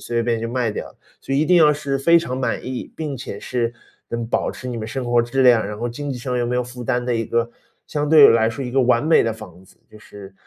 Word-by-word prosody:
随 115 - +1
便 115 -1 0
便 - - -6
就 115 - -3
卖 120 -4 0
掉。 - - -7 0.3
所 135 - -3
以 - - +2
一 155 - +2
定 180 +2 +4
要 150 -2 +6
是 140 -1 -3
非 170 +5 +5
常 130 -6 -4
满 130 - -2
意， 130 -1 -6
并 150 -3 -4
且 100 -4 -7
是 120 -2 -2 0.4
能 115 0 -3
保 - - -1
持 125 - -9
你 120 - -4
们 110 -1 -5
生 130 +2 -4
活 120 0 +3
质 130 +3 0
量， 120 -4 +5
然 105 - -6
后 120 - -2
经 145 +4 -6
济 125 - -5
上 125 0 -3
又 120 - 0
没 125 +1 -2
有 125 - 0
负 125 0 -9
担 120 +2 -1
的 125 - 0
一 115 0 -2
个 115 +1 -1 0.4
相 150 -1 -2
对 155 -3 +8
来 115 -1 +3
说 115 +4 -5
一 125 - -6
个 135 - +2
完 125 +2 +2
美 160 - +5
的 115 -1 -1
房 95 -5 -12
子， - - -23
就 110 - -15
是 100 -2 -13
120 Hz, 310 characters per minute, -21 LUFS, 115-135 Hz, 0.4 s, 对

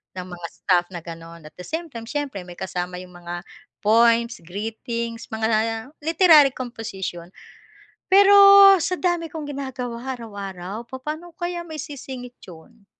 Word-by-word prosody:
ng 185 0 -6
mga 175 -1 -6
stuff 180 -2 +1
na - - -4
gano'n 165 0 -10
at - - -14
the - - -6
same 330 +1 -4
time 230 -1 -8
siyempre 285 -8 -3
may 175 - -10
kasama 180 -1 -4
'yong 180 0 -11
mga 175 0 -6 0.4
poems, 230 +2 +3
greetings, 230 +3 -5
mga 225 +3 -1
literary 320 -4 +6
composition. 195 -8 -6 0.8
Pero, 400 +1 +7 0.5
sa 365 +3 -1
dami 345 -3 0
kong 305 -3 -6
ginagawa 260 -2 -5
araw-araw, 200 -2 -7
papaano 305 +7 -7
ko 340 - -37
kaya 350 -1 -4
maisisingit 270 -5 -8
'yon? 195 +5 -15
230 Hz, 140 wpm, -23 LUFS, 190-290 Hz, 0.8 s, Pero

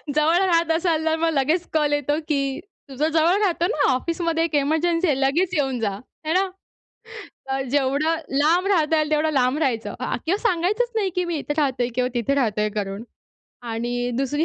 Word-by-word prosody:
जवळ 310 +3 +3
राहत 340 -3 +2
असाल 325 -1 0
तर 320 0 +2
मग 330 0 +1
लगेच 310 +6 +1
कॉल 300 -2 +1
येतो, 290 +1 0
की 275 -1 -1 0.3
तुझं 275 +3 -1
जवळ 330 +5 +3
राहतो 350 -3 +1
ना 290 -5 +2
ऑफिसमध्ये 330 +4 -1
एक 330 - -3
एमर्जन्सी 330 +5 +1
आहे. 290 - +2
लगेच 335 +7 +1
येऊन 270 -6 0
जा. 210 - 0 0.4
है 315 - 0
ना. 380 +1 +2 1.0
अ, 270 0 -1
जेवढं 290 +4 +1 0.2
लांब 340 +6 +3
राहता 320 -5 +2
येईल 305 0 0
तेवढं 310 +1 +2
लांब 255 0 +2
राहायचं 245 -7 -1
अ, - - -2
किंवा 360 +5 +1
सांगायचंच 425 +3 +1
नाही, 410 -4 +1
की 360 0 0
मी 340 -2 -2
इथे 295 0 -3
राहतोय 260 -5 +1
किंवा 250 0 +1
तिथे 240 +3 0
राहतोय 215 -5 +1
करून. 200 +1 -3 0.7
आणि 235 +2 -3 0.2
दुसरी 290 +4 0
305 Hz, 185 wpm, -23 LUFS, 270-335 Hz, 1.0 s, जवळ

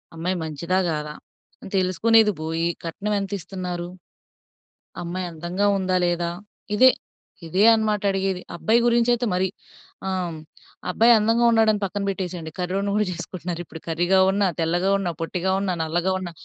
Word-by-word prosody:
అమ్మాయి 175 +3 -2
మంచిదా 165 +4 -1
గాదా? 150 -1 -3 0.5
అని - - -9
తెలుసుకునేది 210 +4 +4
బోయి, 165 +1 -1 0.2
కట్నం 200 +6 -3
ఎంత 195 0 -5
ఇస్తున్నారు? 180 -1 -5 1.2
అమ్మాయి 180 +2 -4
అందంగా 175 +5 -2
ఉందా 185 -1 0
లేదా? 175 0 0 0.5
ఇదే. 255 +4 +7 0.6
ఇదే 185 +5 +2
అన్నమాట 215 -2 +1
అడిగేది. 190 -1 -1
అబ్బాయి 220 +7 +2
గురించి 235 0 +3
అయితే 240 +1 0
మరి. 185 +1 +1 0.6
ఆహ్, 180 -4 -2 0.5
అబ్బాయి 230 +6 +5
అందంగా 225 +3 +2
ఉన్నాడా 225 -1 +4
అని 210 - -3
పక్కన 200 +1 -3
పెట్టేసేయండి. 180 -4 -4
కర్రోడ్ని 195 +3 -1
గూడా 210 0 +2
చేసుకుంటున్నారు 175 0 -5
ఇప్పుడు. 160 +1 -11
కర్రీగా 175 +3 +2
ఉన్న, 200 +1 +1 0.2
తెల్లగా 175 +4 +1
ఉన్న, 185 - -2
పొట్టిగా 180 +3 -1
ఉన్న, 195 -2 -1
నల్లగా 175 +4 0
ఉన్న, 180 -2 -6
185 Hz, 145 wpm, -23 LUFS, 170-205 Hz, 1.2 s, ఇదే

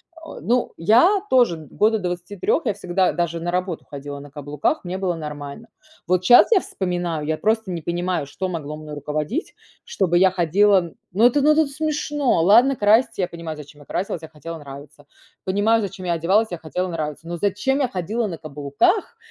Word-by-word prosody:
Э, 325 -1 -11
ну 245 +1 0
я 245 - +4
тоже 245 -10 +4 0.2
года 220 +1 +3
до 180 - -2
23, 180 - -2
я 220 - +2
всегда, 185 -1 0
даже 170 -1 -2
на 175 +1 -3
работу 180 -2 -3
ходила 145 0 -8
на 140 0 -12
каблуках. 145 - -2
Мне 180 +1 -4
было 185 -2 -1
нормально. 150 +5 -7 0.4
Вот 185 +1 +2
щас 240 +5 +8
я 425 - +6
вспоминаю, 175 - -3
я 155 0 0
просто 220 -2 0
не 170 -2 -4
понимаю, 175 -2 -2
что 185 +7 -4
могло 150 -3 -5
мной 155 -1 -8
руководить, 150 - -3 0.3
чтобы 180 -3 0
я 185 +1 +5
ходила, 190 +3 +3
м. 170 -2 -7 0.2
Ну 220 +4 +5
это, 250 +4 +4
ну, 305 - +6
то 315 -1 +3
смешно! 295 - 0
Ладно 240 +8 +5
краситься, 225 +1 +3
я 180 - +1
понимаю, 165 -2 -7
зачем 145 0 -12
я - - -15
красилась- 180 0 -3
я - - -7
хотела 165 +2 -8
нравиться. 145 0 -12 0.4
Понимаю, 205 +4 +2
зачем 195 -2 -6
я 170 - +1
одевалась- 195 +7 +2
я 175 - -3
хотела 165 +4 -3
нравиться. 155 -1 -5
Но 175 0 -4
зачем 205 - 0
я 270 - +2
ходила 215 +3 -2
на 170 -5 -5
каблуках? 150 - 0
180 Hz, 195 wpm, -22 LUFS, 160-220 Hz, 0.4 s, щас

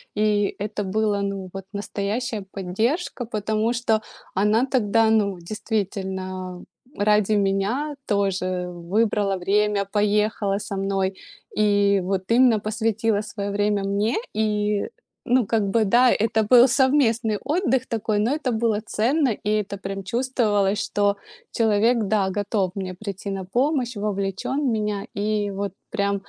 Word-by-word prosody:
И 210 -1 +1
это 205 0 -3
было, 205 +1 0
ну 195 -2 -3
вот, 195 +1 -7
настоящая 205 +2 -3
поддержка, 230 - -2
потому 220 +1 -1
что 225 -2 +1 0.3
она 210 +5 +3
тогда, 225 -3 +2
ну, 200 -4 +2
действительно, 190 -2 -4 0.3
ради 210 0 +2
меня 205 +9 0
тоже 185 -3 0
выбрала 195 +3 0
время, 205 +2 +1
поехала 210 -1 +1
со 200 - -5
мной. 195 0 -1 0.4
И 205 -2 +3
вот 190 0 -2
именно 240 -2 +5
посвятила 220 0 0
своё 205 -1 -5
время 205 0 +1
мне. 200 +4 0 0.2
И 210 -1 0 0.4
ну, 250 -1 +3
как 220 +1 +1
бы 225 +3 +2
да, 240 +5 +5
это 220 0 +1
был 245 +3 +7
совместный 240 -4 +2
отдых 290 -6 +1
такой, 220 -2 -1
но 225 +5 +1
это 290 -4 -1
было 220 -2 0
ценно, 260 +7 +1
и 210 -1 -3
это 200 0 -7
прям 195 0 -5
чувствовалось, 210 -3 +1
что 205 0 +1 0.3
человек, 225 +1 +2
да, 195 -1 +1
готов 205 -2 0
мне 185 -2 -4
прийти 200 0 -6
на 195 -1 -4
помощь, 250 - 0
вовлечён 200 +6 -2
в - - -1
меня. 210 -2 -1
И 205 0 -1
вот 200 -1 -4 0.2
прям, 200 -1 0
210 Hz, 135 wpm, -23 LUFS, 195-225 Hz, 0.4 s, был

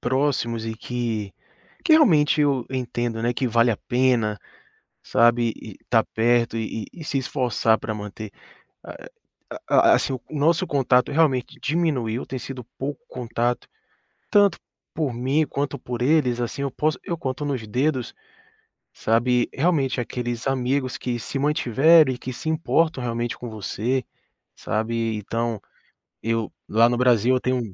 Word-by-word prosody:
próximos 125 -3 0
e 110 - -3
que 115 -4 -3 0.5
que 335 - +4
realmente 155 - +5
eu 140 -4 +1
entendo, 120 -3 -3
né, 120 +1 +1
que 130 +2 -1
vale 115 +1 +3
a 110 - 0
pena, 120 -4 +1 0.6
sabe, 120 -1 +3
e 110 -4 -11
tá 115 -2 +3
perto 115 0 +1
e 110 0 -3
e 175 - -13
e - - -7
se 145 - -2
esforçar 125 -4 +1
pra 110 - -4
manter. 105 0 -7 0.5
A - - -10 0.6
a 345 0 +6
assim, - - +1
o 130 - -4
nosso 160 +4 +1
contato 130 -2 +2
realmente 145 -5 +1
diminuiu, 140 -8 0
tem 130 - -5
sido 130 0 -7
pouco 145 - -4
contato, 120 0 -2 0.7
tanto 200 -4 +4 0.4
por 150 -6 -1
mim 135 +6 +1
quanto 140 +1 -3
por 120 -1 -5
eles, 125 -4 +2
assim, 120 +3 -3
eu 140 - -1
posso 155 +4 -1
eu 170 - -3
conto 130 0 -4
nos 135 -6 -3
dedos, 130 +3 -1 0.8
sabe, 120 +2 +1
realmente 140 -4 +1
aqueles 120 0 -4
amigos 130 0 0
que 120 -1 -3
se 135 - -5
mantiveram 150 +1 +4
e 125 - -6
que 130 - -6
se 140 - -6
importam 160 -2 +1
realmente 120 0 -2
com 120 - -7
você, 110 +4 -2 0.5
sabe, 115 +1 -2
então, 115 +2 -2 0.7
eu 115 -1 -1 0.2
lá 115 +2 +5
no 120 - 0
Brasil 125 0 +3
eu - - +1
tenho 130 0 0
é - - -9
é - - -15
125 Hz, 155 wpm, -23 LUFS, 115-140 Hz, 0.8 s, a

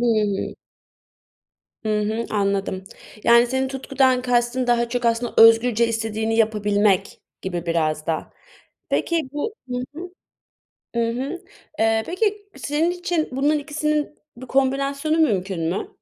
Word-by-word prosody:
Hı - - +1
hı. 215 -4 0 1.3
Hı 215 -1 +1
hı, 220 +2 -2
anladım. 200 -2 -1 0.4
Yani, 235 +1 +6
senin 265 +2 -1
tutkudan 265 -1 +1
kastın 245 0 +1
daha 240 -1 +2
çok 245 +1 -2
aslında 235 +1 0
özgürce 230 0 +6
istediğini 225 0 -1
yapabilmek 210 -3 +1 0.2
gibi, 175 -2 -4
biraz 155 -2 0
da. 160 -1 -2 0.6
Peki, 330 -5 0
bu 295 +9 -3 0.2
Hı 250 - -2 0.2
hı, 335 +4 -7 0.9
ı - - +1
hı, 275 +9 -4 0.4
eee, 225 0 +2
peki 410 +2 -1
senin 310 +4 0
için 350 -3 -2
bunların 290 +4 +1
ikisinin 300 0 -1 0.3
bir 260 - -9
kombinasyonu 275 +4 +1
mümkün 190 - +1
mü? 180 - -3
240 Hz, 125 wpm, -22 LUFS, 215-280 Hz, 1.3 s, Yani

